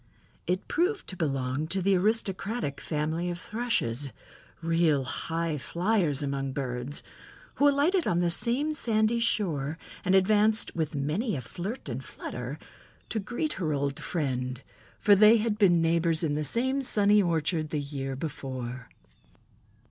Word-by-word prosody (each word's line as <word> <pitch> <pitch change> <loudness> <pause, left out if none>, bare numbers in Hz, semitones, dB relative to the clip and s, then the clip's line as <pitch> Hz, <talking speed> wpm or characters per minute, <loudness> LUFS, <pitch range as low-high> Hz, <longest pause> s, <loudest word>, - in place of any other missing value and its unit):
It 180 +2 -1
proved 370 +4 0
to 185 - -5
belong 135 -3 -1
to 190 +4 -1
the 195 +1 +3
aristocratic 200 -3 -1
family 160 +3 -2
of 175 0 -4
Thrushes—real 165 - -1
high 165 +3 -2
flyers 170 -3 0
among 135 -1 -2
birds—who 140 - -2
alighted 310 +6 +2
on 175 - +2
the 175 -1 +2
same 255 - +1
sandy 225 -4 +2
shore 160 -10 0 0.3
and 185 +1 +3
advanced 215 +3 +3
"with 160 -2 -2
many 160 - -1
a 130 - -3
flirt 190 - -6
and 130 0 -4
flutter" 125 +3 -6 0.5
to 220 - -1
greet 245 +9 -2
her 155 -3 0
old 140 0 -1
friend, 130 -5 -3 0.3
for 205 - +5
they 215 +3 +7
had 215 -1 -1
been 175 -5 +5
neighbors 165 0 +2
in 150 -3 +1
the 150 +1 -1
same 260 - +1
sunny 210 -4 +5
orchard 160 -3 0
the 150 - -1
year 140 -2 -4
before. 130 -4 -6
170 Hz, 140 wpm, -28 LUFS, 140-215 Hz, 0.5 s, they